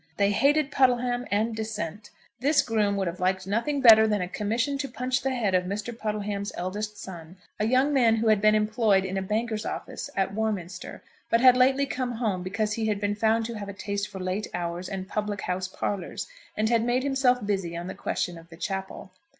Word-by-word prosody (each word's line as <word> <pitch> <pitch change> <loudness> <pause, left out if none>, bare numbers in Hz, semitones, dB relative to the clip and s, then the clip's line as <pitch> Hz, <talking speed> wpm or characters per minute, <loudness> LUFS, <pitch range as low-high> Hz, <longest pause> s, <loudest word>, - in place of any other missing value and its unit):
They 200 0 +3
hated 280 +6 +3
Puddleham 250 -2 +2
and 220 +2 0
dissent. 210 -3 -5 0.3
This 285 +3 +3
groom 215 -5 +1
would 195 -1 0
have 175 +2 -4
liked 185 0 0
nothing 235 +8 0
better 220 -3 +8
than 210 -1 +1
a 180 - -2
commission 230 +9 -1
to 275 - -2
punch 255 +2 -1
the 270 - 0
head 235 -7 0
of 180 0 +2
Mr. 205 +5 -4
Puddleham's 210 -2 -3
eldest 210 +4 -4
son, 175 -1 -9 0.2
a 210 - +1
young 260 +4 +3
man 235 -5 +4
who 225 0 +1
had 215 -2 +4
been 215 0 +5
employed 210 -2 +2
in 190 0 -3
a 190 - 0
banker's 215 +2 -1
office - - -5
at 195 0 0
Warminster, 195 -5 -4 0.3
but 230 - +4
had 255 -1 +8
lately 265 +2 +4
come 255 -2 -3
home 220 -6 -1
because 210 +3 -1
he 220 0 -1
had 210 -2 0
been 205 0 0
found 220 +2 +2
to 235 - -4
have 200 -1 -6
a - - -5
taste 200 +1 -3
for 200 - -9
late 185 +3 -2
hours 175 +1 -4
and 190 -1 -5
public 210 -1 -3
house 185 +1 -2
parlours; 190 0 -4 0.3
and 215 +1 +1
had 230 -1 +3
made 245 +2 +1
himself 265 -4 +2
busy 190 -5 -2
on 170 - -5
the 190 - -5
question 175 -2 -3
of 165 0 -17
the 165 - -12
chapel. 190 +1 -5
210 Hz, 215 wpm, -27 LUFS, 190-240 Hz, 0.3 s, better